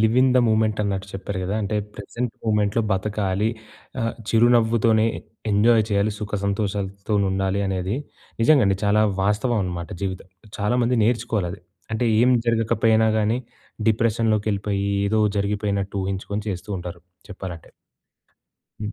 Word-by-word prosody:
'Live 110 +2 +3
in 130 0 +4
the - - +6
moment' 110 -1 +2
అన్నట్టు 100 -1 -2
చెప్పారు 95 0 -5
గదా! 95 +3 -2
అంటే 105 +2 -1 0.2
ప్రెజెంట్ 115 +3 -4
మూమెంట్‌లో 105 0 +1
బతకాలి. 100 +1 0 0.5
ఆహ్, 115 0 0 0.2
చిరునవ్వుతోనే 115 -1 +4 0.4
ఎంజాయ్ 110 +2 +4
చేయాలి. 100 +1 +1
సుఖసంతోషాలతోనుండాలి 100 -1 -1
అనేది 95 +3 -2 0.5
నిజంగా 140 0 +5
అండి. 95 0 +2
చాలా 105 +1 +4 0.2
వాస్తవం 105 +4 +1
అనమాట. 85 -2 -4
జీవితం 95 -1 -4 0.3
చాలామంది 120 +4 +1
నేర్చుకోవాలి 115 -5 0
అది. 95 - -10 0.3
అంటే 110 +3 0 0.2
ఏం 125 +2 +5 0.2
జరగకపోయినా 110 -1 +3
గానీ 110 +3 +1 0.5
డిప్రెషన్‌లోకెళ్ళిపోయి 105 -3 +1 0.2
ఏదో 110 +2 +2 0.2
జరిగిపోయినట్టు 100 -1 -1
ఊహించుకొని 100 +2 -3
చేస్తూ 95 +1 -5
ఉంటారు. 90 -1 -7 0.3
చెప్పాలంటే. 95 -4 -8 1.1
హ్మ్. 105 0 -4
105 Hz, 120 wpm, -23 LUFS, 100-110 Hz, 1.1 s, the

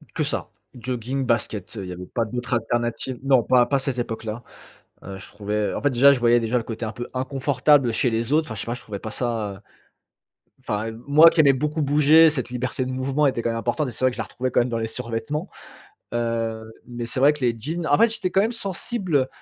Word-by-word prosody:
Que - - 0
ça. - - -3 0.3
Jogging, 125 +2 -3
baskets, 115 -3 -2
heu, 100 - -4
il 90 - -7
y - - -5
avait 90 +1 -7
pas 115 +4 -2
d'autres 120 +2 -4
alternatives. 120 +2 -2
Non, 135 -3 +4
pas 125 -1 +4
pas 140 -1 +1
cette 135 -2 -2
époque 115 -2 -4
là. 115 +2 -5 0.6
Heu, 95 0 -7
je 95 - -10
trouvais 105 0 -2
en - - -4
fait 145 - +3
déjà, 135 +3 +6
je 130 - +1
voyais 120 0 +4
déjà, 115 +2 -1
le 115 - 0
côté 115 0 -5
un 110 - -4
peu 120 +2 -7
inconfortable 130 0 +2
chez 120 +2 +1
les 115 +4 -2
autres. 155 +1 +3
Enfin 110 - -5
je - - -5
sais - - -5
pas, 120 - -2
je - - -8
trouvais 100 -2 -6
pas 110 - -7
ça 110 -5 -3 1.0
enfin 105 +2 -3 0.2
moi 155 +3 +8
qui 160 - +2
aimais 140 -2 +6
beaucoup 150 +3 -1
bouger, 150 +3 +6
cette 130 -5 -2
liberté 125 +1 -2
de 130 - -4
mouvement 135 +3 0
était 120 -3 -2
quand 115 - 0
même 115 - -2
importante 120 +5 -1
et - - -5
c'est 130 - -3
vrai 130 - +5
que - - -9
je - - -4
la - - -1
retrouvais 130 +1 -4
quand - - +3
même 120 - +1
dans 115 - -2
les 110 - -2
survêtements. 115 +7 -4 0.7
Heu, 115 -1 -2
mais 120 -1 -6
c'est 130 - -2
vrai 145 +2 +6
que 150 - -8
les 115 -1 +1
jeans 160 +8 -4
en 145 - +4
fait 230 - +6
j'étais 185 -5 -2
quand 195 - +3
même 225 +4 +1
sensible, 190 - -1
125 Hz, 250 wpm, -23 LUFS, 115-140 Hz, 1.0 s, moi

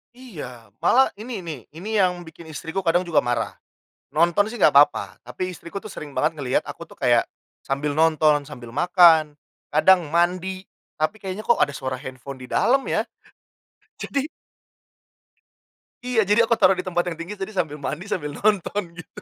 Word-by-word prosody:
Iya, 125 - -10
malah 265 +2 +4
ini 240 0 -5
nih, 155 -5 -5
ini 175 +8 -8
yang 180 -1 0
bikin 160 0 -13
istriku 160 +4 -4
kadang 175 +1 +2
juga 170 -3 +3
marah. 120 -1 -2 0.6
Nonton 170 +8 +2
sih 240 - -7
enggak - - +5
apa-apa, 140 +1 +3
tapi 185 - -5
istriku 170 +3 -9
tuh 210 +1 -7
sering 145 -3 -8
banget 155 +5 +2
ngelihat 135 -5 -1
aku - - -9
tuh - - -16
kayak - - +2 0.3
sambil 140 +2 -2
nonton, 155 -1 +3
sambil 125 -5 -11
makan, 165 -2 +5 0.3
kadang 170 +1 +4
mandi, 180 +3 0 0.3
tapi 180 +8 -1
kayaknya 195 +2 -5
kok 235 - +3
ada 145 - +4
suara 130 -1 -4
handphone 130 0 -9
di 125 - -10
dalam 270 +2 +3
ya, - - 0 0.9
jadi 280 +2 -2 1.8
Iya, 245 -3 +2
jadi 205 +2 +2
aku 235 - +3
taruh 195 -3 +4
di - - -2
tempat 175 -1 +1
yang 165 - -7
tinggi, 175 +5 -6
jadi 195 +1 -6
sambil 170 -7 -2
mandi, 150 +5 -5
sambil 150 -7 -3
nonton 205 +3 0
gitu. 175 - -11
170 Hz, 170 wpm, -23 LUFS, 150-195 Hz, 1.8 s, enggak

